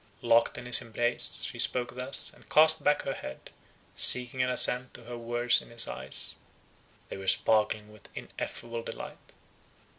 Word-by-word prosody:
Locked 115 Hz, 0 st, +3 dB
in -, -, -8 dB
his 125 Hz, -, +5 dB
embrace, 120 Hz, +1 st, -1 dB
she -, -, -6 dB
spoke 120 Hz, -1 st, -1 dB
thus, 125 Hz, +2 st, -2 dB
and -, -, -21 dB
cast 155 Hz, 0 st, +4 dB
back 145 Hz, -, +2 dB
her -, -, -3 dB
head, 65 Hz, -, -9 dB, 0.4 s
seeking 125 Hz, +1 st, +3 dB
an 125 Hz, -, +1 dB
assent 125 Hz, 0 st, +2 dB
to 120 Hz, -, -10 dB
her 120 Hz, +1 st, -8 dB
words 120 Hz, +1 st, +3 dB
in -, -, -15 dB
his 115 Hz, 0 st, -2 dB
eyes—they 65 Hz, +7 st, -7 dB
were 95 Hz, 0 st, -9 dB
sparkling 105 Hz, +1 st, +2 dB
with 105 Hz, -2 st, -17 dB
ineffable 115 Hz, 0 st, -7 dB
delight. -, -, -10 dB
120 Hz, 155 wpm, -28 LUFS, 115-125 Hz, 0.4 s, his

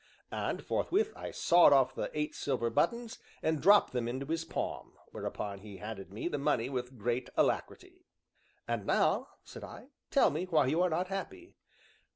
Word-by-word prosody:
And, -, -, -3 dB
forthwith, 430 Hz, +3 st, 0 dB
I -, -, -6 dB
sawed 170 Hz, -3 st, +5 dB
off 130 Hz, -1 st, +4 dB
the -, -, -3 dB
eight 150 Hz, 0 st, -1 dB
silver 125 Hz, -4 st, -1 dB
buttons 225 Hz, -, 0 dB, 0.2 s
and 160 Hz, -1 st, +1 dB
dropped 205 Hz, -3 st, +6 dB
them 120 Hz, -2 st, -1 dB
into 130 Hz, +3 st, -3 dB
his 165 Hz, +3 st, -2 dB
palm, 165 Hz, -, -4 dB, 0.2 s
whereupon 100 Hz, -1 st, -5 dB
he 100 Hz, -1 st, -10 dB
handed 105 Hz, -3 st, -7 dB
me 105 Hz, +11 st, -4 dB
the 160 Hz, -, -2 dB
money 125 Hz, -3 st, +1 dB
with 125 Hz, -1 st, -4 dB
great 120 Hz, +3 st, -2 dB
alacrity. 365 Hz, -1 st, -1 dB, 0.6 s
"And -, -, -2 dB
now," -, -, +2 dB, 0.2 s
said -, -, -11 dB
I, 260 Hz, -, -10 dB, 0.2 s
"tell 275 Hz, -, +4 dB
me 160 Hz, +5 st, -2 dB
why 160 Hz, -6 st, +3 dB
you 155 Hz, +7 st, +1 dB
are 180 Hz, -, +3 dB
not 180 Hz, +3 st, -1 dB
happy." 270 Hz, -, -6 dB
150 Hz, 175 wpm, -32 LUFS, 125-185 Hz, 0.6 s, dropped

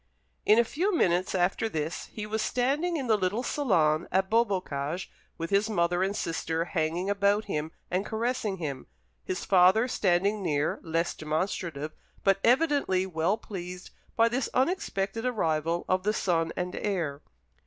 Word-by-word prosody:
In 215 Hz, -, +7 dB
a 235 Hz, -, +6 dB
few 355 Hz, -, -1 dB
minutes 180 Hz, -, +2 dB
after 190 Hz, +5 st, +1 dB
this 160 Hz, -2 st, -3 dB
he 210 Hz, -, -6 dB
was 220 Hz, +1 st, -2 dB
standing 285 Hz, +10 st, 0 dB
in 275 Hz, -, -3 dB
the 225 Hz, -3 st, +4 dB
little 200 Hz, +6 st, 0 dB
salon 170 Hz, -, +2 dB
at 190 Hz, +2 st, +1 dB
Beaubocage, 185 Hz, -8 st, 0 dB, 0.3 s
with 165 Hz, +2 st, -4 dB
his 200 Hz, +2 st, +3 dB
mother 175 Hz, -3 st, +1 dB
and 195 Hz, +2 st, 0 dB
sister 165 Hz, -2 st, -2 dB
hanging 170 Hz, +1 st, -1 dB
about 200 Hz, +1 st, +2 dB
him 155 Hz, -5 st, -3 dB, 0.2 s
and 185 Hz, +2 st, +1 dB
caressing 220 Hz, -2 st, -2 dB
him, 140 Hz, -6 st, -5 dB, 0.4 s
his 185 Hz, -, -4 dB
father 190 Hz, +5 st, +5 dB
standing 200 Hz, -1 st, +1 dB
near, 150 Hz, -4 st, 0 dB
less 165 Hz, +1 st, -1 dB
demonstrative, 155 Hz, -1 st, -3 dB, 0.3 s
but 195 Hz, -1 st, +3 dB
evidently 260 Hz, -, +3 dB
well 180 Hz, +3 st, 0 dB
pleased 180 Hz, -4 st, -8 dB, 0.2 s
by 230 Hz, 0 st, +5 dB
this 245 Hz, +3 st, -1 dB
unexpected 230 Hz, -, 0 dB
arrival 165 Hz, -8 st, 0 dB
of 185 Hz, 0 st, +2 dB
the 210 Hz, +3 st, 0 dB
son 165 Hz, -5 st, 0 dB
and 180 Hz, 0 st, -3 dB
heir. 165 Hz, -9 st, -2 dB
190 Hz, 155 wpm, -28 LUFS, 170-220 Hz, 0.4 s, In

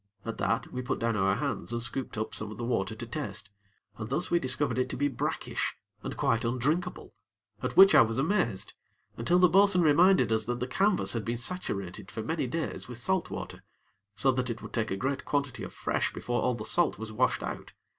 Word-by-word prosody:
At 115 Hz, -, -5 dB
that, 115 Hz, -, -1 dB
we 125 Hz, -, -2 dB
put 125 Hz, -, -2 dB
down 115 Hz, -1 st, 0 dB
our 95 Hz, -1 st, +2 dB
hands 140 Hz, -1 st, -3 dB
and 120 Hz, -, -1 dB
scooped 120 Hz, 0 st, -2 dB
up 110 Hz, -, -3 dB
some 105 Hz, -, -5 dB
of 110 Hz, -, -8 dB
the 120 Hz, -, -5 dB
water 110 Hz, -3 st, -1 dB
to 120 Hz, -, -6 dB
taste, 105 Hz, -7 st, -5 dB, 0.5 s
and 110 Hz, -1 st, -5 dB
thus 155 Hz, +7 st, -1 dB
we 170 Hz, -, +4 dB
discovered 130 Hz, -2 st, 0 dB
it 130 Hz, -, 0 dB
to -, -, -4 dB
be 145 Hz, +2 st, +2 dB
brackish 135 Hz, -5 st, -2 dB, 0.3 s
and -, -, -6 dB
quite 115 Hz, 0 st, +1 dB
undrinkable, 130 Hz, +9 st, -1 dB, 0.5 s
at -, -, -3 dB
which 195 Hz, 0 st, +9 dB
I -, -, +9 dB
was 115 Hz, -1 st, +1 dB
amazed, 135 Hz, -, 0 dB, 0.4 s
until 145 Hz, +10 st, +2 dB
the 180 Hz, 0 st, +7 dB
bo'sun 190 Hz, +1 st, +5 dB
reminded 170 Hz, +1 st, +5 dB
us 110 Hz, -1 st, +1 dB
that 120 Hz, +1 st, -2 dB
the 125 Hz, -, -1 dB
canvas 190 Hz, +9 st, +1 dB
had 115 Hz, -2 st, -2 dB
been 120 Hz, +2 st, -2 dB
saturated 105 Hz, -, -4 dB
for 110 Hz, -, -5 dB
many 155 Hz, +3 st, -1 dB
days 160 Hz, +5 st, -3 dB
with 120 Hz, -, -7 dB
salt 190 Hz, +8 st, 0 dB
water, -, -, -6 dB, 0.5 s
so 135 Hz, -, +3 dB
that 130 Hz, 0 st, -1 dB
it 115 Hz, 0 st, -5 dB
would -, -, -9 dB
take 110 Hz, -2 st, 0 dB
a 95 Hz, -, -2 dB
great 135 Hz, +5 st, -2 dB
quantity 140 Hz, -3 st, -1 dB
of -, -, -6 dB
fresh -, -, -1 dB
before 120 Hz, 0 st, -2 dB
all 125 Hz, -1 st, +1 dB
the 110 Hz, -2 st, -6 dB
salt 175 Hz, +9 st, +2 dB
was 110 Hz, 0 st, -6 dB
washed 110 Hz, -, +1 dB
out. -, -, -6 dB
125 Hz, 220 wpm, -29 LUFS, 110-150 Hz, 0.5 s, which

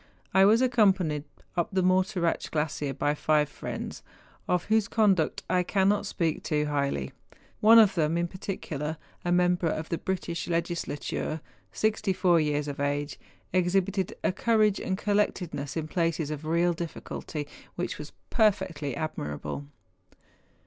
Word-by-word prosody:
I 190 Hz, 0 st, +6 dB
was 225 Hz, +5 st, +5 dB
accompanied 190 Hz, -, +2 dB, 0.3 s
up 175 Hz, -, 0 dB
the 190 Hz, -1 st, +1 dB
Morteratsch 185 Hz, -1 st, +1 dB
glacier 150 Hz, -2 st, -1 dB
by 145 Hz, +2 st, 0 dB
five 150 Hz, 0 st, +2 dB
friends, -, -, -6 dB, 0.5 s
of 180 Hz, -1 st, +1 dB
whose 215 Hz, -1 st, +2 dB
conduct 195 Hz, -8 st, +2 dB
I 180 Hz, -, +2 dB
cannot 200 Hz, +2 st, +2 dB
speak 165 Hz, -5 st, -1 dB
too 150 Hz, -1 st, 0 dB
highly. 140 Hz, -, -1 dB, 0.5 s
One 225 Hz, +2 st, +8 dB
of 215 Hz, -4 st, +7 dB
them 165 Hz, -1 st, +1 dB
in 170 Hz, 0 st, 0 dB
particular, 160 Hz, -5 st, -4 dB, 0.3 s
a 175 Hz, -, -1 dB
member 180 Hz, 0 st, +3 dB
of 155 Hz, 0 st, -2 dB
the 170 Hz, -, -1 dB
British 175 Hz, -3 st, -3 dB
Legislature, 170 Hz, -2 st, -2 dB, 0.3 s
sixty 215 Hz, -2 st, 0 dB
four 180 Hz, -2 st, +4 dB
years 150 Hz, -1 st, 0 dB
of 140 Hz, -1 st, -5 dB
age, 145 Hz, +1 st, -1 dB, 0.3 s
exhibited 185 Hz, +1 st, +1 dB
a -, -, +3 dB
courage 215 Hz, 0 st, +2 dB
and 190 Hz, -, -2 dB
collectedness 185 Hz, -8 st, -1 dB
in 155 Hz, -1 st, -2 dB
places 165 Hz, -3 st, 0 dB
of 150 Hz, 0 st, -5 dB
real 170 Hz, +2 st, +2 dB
difficulty, 160 Hz, -2 st, -5 dB, 0.3 s
which -, -, -3 dB
was -, -, -7 dB, 0.2 s
perfectly 170 Hz, -, +1 dB
admirable. 140 Hz, -, -4 dB
170 Hz, 140 wpm, -28 LUFS, 150-190 Hz, 0.5 s, One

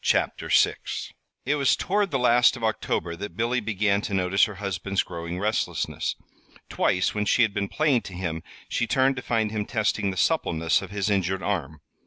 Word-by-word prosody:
"THE -, -, +4 dB, 0.2 s
PAINTING -, -, -8 dB, 0.2 s
LOOK" -, -, -12 dB, 0.7 s
It 145 Hz, +3 st, +2 dB
was 140 Hz, -2 st, +3 dB
toward 200 Hz, +1 st, 0 dB
the 140 Hz, -, 0 dB
last 125 Hz, 0 st, +4 dB
of 120 Hz, -, -9 dB
October 105 Hz, -5 st, -1 dB
that 100 Hz, +3 st, -7 dB
Billy 120 Hz, +2 st, +1 dB
began 105 Hz, -2 st, 0 dB
to 100 Hz, -, -3 dB
notice 95 Hz, +3 st, +3 dB
her 105 Hz, -3 st, -7 dB
husband's 100 Hz, -1 st, -2 dB
growing 85 Hz, +1 st, -6 dB
restlessness. 105 Hz, +3 st, -1 dB, 0.5 s
Twice, 90 Hz, -, +1 dB
when 105 Hz, 0 st, -1 dB
she 120 Hz, -, +4 dB
had 110 Hz, -3 st, +1 dB
been 100 Hz, -, -1 dB
playing 145 Hz, -6 st, +2 dB
to -, -, -11 dB
him, 85 Hz, -3 st, -3 dB, 0.3 s
she 120 Hz, -, -1 dB
turned 135 Hz, +2 st, +2 dB
to -, -, -3 dB
find 110 Hz, -3 st, 0 dB
him 105 Hz, -1 st, -1 dB
testing 105 Hz, -2 st, 0 dB
the 95 Hz, -, -5 dB
suppleness 80 Hz, -1 st, +1 dB
of 95 Hz, -, -8 dB
his 100 Hz, +1 st, -1 dB
injured 95 Hz, -1 st, 0 dB
arm. 80 Hz, -7 st, -3 dB
105 Hz, 195 wpm, -25 LUFS, 95-120 Hz, 0.7 s, THE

